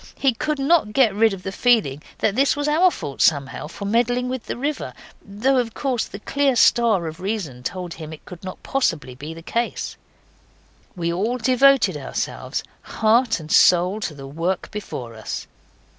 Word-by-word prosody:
He 270 Hz, -2 st, +2 dB
could 305 Hz, +6 st, -2 dB
not 275 Hz, -5 st, +2 dB
get 240 Hz, -5 st, +4 dB
rid 220 Hz, +2 st, +4 dB
of 190 Hz, -2 st, -6 dB
the 195 Hz, -, -4 dB
feeling 200 Hz, -, +2 dB, 0.2 s
that 210 Hz, -, 0 dB
this 275 Hz, +2 st, +3 dB
was 290 Hz, 0 st, -2 dB
our 325 Hz, +5 st, +5 dB
fault 140 Hz, -, -6 dB
somehow 140 Hz, -2 st, +1 dB
for 200 Hz, +5 st, -8 dB
meddling 245 Hz, +4 st, +1 dB
with 255 Hz, -2 st, -5 dB
the -, -, -4 dB
river, 290 Hz, +4 st, -3 dB, 0.3 s
though 225 Hz, +7 st, 0 dB
of 230 Hz, -4 st, -1 dB
course 250 Hz, +2 st, -1 dB
the -, -, -9 dB
clear 275 Hz, +5 st, +1 dB
star 225 Hz, -6 st, +4 dB
of 160 Hz, +1 st, -6 dB
reason 185 Hz, -, -4 dB
told 180 Hz, +5 st, -5 dB
him 155 Hz, -1 st, -8 dB
it 160 Hz, -, -11 dB
could 180 Hz, 0 st, -11 dB
not 185 Hz, 0 st, -8 dB
possibly 165 Hz, -, -1 dB
be 150 Hz, +6 st, -8 dB
the 165 Hz, -, -11 dB
case. 235 Hz, +6 st, -2 dB, 1.0 s
We 170 Hz, -1 st, -1 dB
all 220 Hz, +8 st, -1 dB
devoted 260 Hz, +3 st, +4 dB
ourselves, -, -, -4 dB, 0.2 s
heart 225 Hz, +1 st, +2 dB
and 155 Hz, 0 st, -9 dB
soul, 180 Hz, +3 st, +5 dB
to 170 Hz, -8 st, -4 dB
the 135 Hz, -1 st, -9 dB
work 165 Hz, +6 st, -3 dB
before 130 Hz, -, -6 dB
us. 110 Hz, -1 st, -6 dB
210 Hz, 180 wpm, -22 LUFS, 170-250 Hz, 1.0 s, our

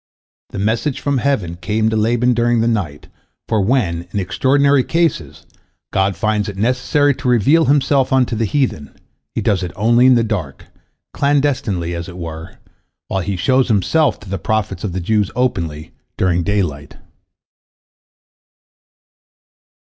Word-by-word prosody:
This -, -, -6 dB
message 115 Hz, +7 st, -1 dB
from 140 Hz, -2 st, 0 dB
heaven 105 Hz, -12 st, -1 dB
came 110 Hz, +5 st, 0 dB
to -, -, -1 dB
Laban 120 Hz, +3 st, +2 dB
during 120 Hz, 0 st, +1 dB
the 115 Hz, -, +1 dB
night, 95 Hz, -11 st, -2 dB, 0.4 s
for 110 Hz, -2 st, +1 dB
when, 95 Hz, -7 st, 0 dB
in 105 Hz, -, -2 dB
extraordinary 135 Hz, +8 st, +2 dB
cases, 165 Hz, -, -1 dB, 0.5 s
God 95 Hz, 0 st, +1 dB
finds 105 Hz, +2 st, -1 dB
it 100 Hz, -, -8 dB
necessary 130 Hz, +6 st, +1 dB
to 130 Hz, -, -6 dB
reveal 125 Hz, +7 st, +4 dB
Himself 140 Hz, -1 st, +2 dB
unto 130 Hz, -3 st, +2 dB
the 110 Hz, +1 st, 0 dB
heathen, 105 Hz, -, -2 dB, 0.4 s
He -, -, -1 dB
does 95 Hz, -2 st, +1 dB
it 90 Hz, -2 st, -4 dB
only 120 Hz, +4 st, +4 dB
in 130 Hz, -, +6 dB
the 115 Hz, -, +3 dB
dark, 90 Hz, -11 st, -4 dB, 0.5 s
clandestinely 135 Hz, -, 0 dB
as 85 Hz, +1 st, -5 dB
it 90 Hz, -, -10 dB
were, 80 Hz, -1 st, -8 dB, 0.5 s
while 95 Hz, -, -1 dB
He 100 Hz, +2 st, -3 dB
shows 130 Hz, +9 st, +2 dB
Himself 125 Hz, -, +1 dB
to 105 Hz, -, -12 dB
the 95 Hz, -1 st, -3 dB
prophets 105 Hz, -3 st, -2 dB
of 100 Hz, -5 st, -3 dB
the 95 Hz, -, -3 dB
Jews 105 Hz, +2 st, +1 dB
openly, 85 Hz, -11 st, -2 dB, 0.3 s
during 90 Hz, -2 st, +1 dB
daylight. 85 Hz, -7 st, -2 dB
110 Hz, 150 wpm, -18 LUFS, 90-130 Hz, 0.5 s, in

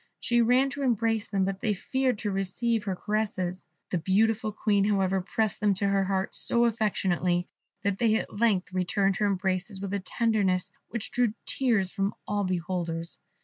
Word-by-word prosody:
She 240 Hz, 0 st, +2 dB
ran 250 Hz, +4 st, +3 dB
to 285 Hz, -, -5 dB
embrace 225 Hz, -4 st, +1 dB
them, 195 Hz, -1 st, +1 dB
but 195 Hz, 0 st, -3 dB
they 215 Hz, -3 st, +1 dB
feared 260 Hz, +4 st, 0 dB
to 205 Hz, 0 st, -2 dB
receive 210 Hz, +4 st, 0 dB
her 190 Hz, -2 st, -1 dB
caresses; 190 Hz, -3 st, -2 dB, 0.2 s
the 180 Hz, -, +1 dB
beautiful 215 Hz, +5 st, +2 dB
Queen, 205 Hz, -1 st, +1 dB
however, 195 Hz, -2 st, +2 dB
pressed 215 Hz, +3 st, -1 dB
them 205 Hz, -2 st, +2 dB
to 200 Hz, +1 st, 0 dB
her 195 Hz, -1 st, +2 dB
heart 190 Hz, 0 st, -1 dB
so 235 Hz, 0 st, +2 dB
affectionately 185 Hz, -5 st, +1 dB, 0.4 s
that 200 Hz, -1 st, 0 dB
they 225 Hz, -2 st, +3 dB
at 205 Hz, -, -3 dB
length 200 Hz, -5 st, +2 dB
returned 195 Hz, +1 st, +1 dB
her 210 Hz, -, +2 dB
embraces 190 Hz, 0 st, -1 dB
with 200 Hz, 0 st, -4 dB
a 200 Hz, -, 0 dB
tenderness 195 Hz, -2 st, 0 dB, 0.2 s
which 225 Hz, -2 st, -4 dB
drew 240 Hz, -3 st, +1 dB
tears 220 Hz, -9 st, +1 dB
from 195 Hz, 0 st, -1 dB
all 205 Hz, 0 st, 0 dB
beholders. 175 Hz, -2 st, -3 dB
200 Hz, 175 wpm, -28 LUFS, 190-220 Hz, 0.4 s, ran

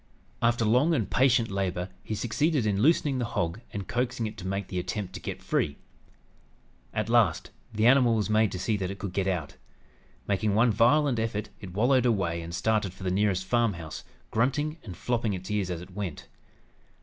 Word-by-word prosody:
After 115 Hz, -1 st, +2 dB
long 130 Hz, +10 st, +4 dB
and 115 Hz, -8 st, 0 dB
patient 125 Hz, -4 st, +3 dB
labor 95 Hz, -2 st, -2 dB
he 110 Hz, -, -3 dB
succeeded 135 Hz, +4 st, 0 dB
in 100 Hz, -1 st, +1 dB
loosening 145 Hz, -1 st, +3 dB
the 120 Hz, -, 0 dB
hog 85 Hz, +6 st, -1 dB
and 100 Hz, -2 st, -5 dB
coaxing 120 Hz, -2 st, -1 dB
it 110 Hz, 0 st, -5 dB
to 95 Hz, -2 st, -6 dB
make 95 Hz, +1 st, -2 dB
the 90 Hz, -, -3 dB
attempt 95 Hz, +1 st, -4 dB
to -, -, -6 dB
get -, -, -6 dB
free. 70 Hz, -1 st, 0 dB, 1.1 s
At 110 Hz, -1 st, -2 dB
last, 115 Hz, -8 st, +2 dB, 0.2 s
the 110 Hz, 0 st, 0 dB
animal 125 Hz, -2 st, +5 dB
was 105 Hz, -2 st, 0 dB
made 110 Hz, -1 st, +3 dB
to -, -, -3 dB
see 105 Hz, +4 st, 0 dB
that 95 Hz, -2 st, -2 dB
it 100 Hz, -, -5 dB
could 95 Hz, -1 st, -5 dB
get 95 Hz, 0 st, 0 dB
out. 90 Hz, -6 st, -2 dB, 0.7 s
Making 100 Hz, +1 st, +1 dB
one 115 Hz, +2 st, +4 dB
violent 125 Hz, +4 st, +3 dB
effort 110 Hz, -1 st, -2 dB
it 95 Hz, -3 st, -9 dB
wallowed 125 Hz, +3 st, +3 dB
away 95 Hz, -7 st, 0 dB
and 85 Hz, +1 st, -6 dB
started 105 Hz, -3 st, 0 dB
for 95 Hz, -, -11 dB
the 90 Hz, -, 0 dB
nearest 95 Hz, -1 st, +1 dB
farmhouse, 100 Hz, -9 st, -1 dB, 0.3 s
grunting 145 Hz, +7 st, 0 dB
and 95 Hz, -5 st, -8 dB
flopping 115 Hz, -4 st, -1 dB
its 95 Hz, +2 st, -7 dB
ears 100 Hz, -3 st, 0 dB
as 85 Hz, -2 st, -4 dB
it 90 Hz, +1 st, -12 dB
went. 95 Hz, -6 st, -5 dB
105 Hz, 195 wpm, -28 LUFS, 95-120 Hz, 1.1 s, animal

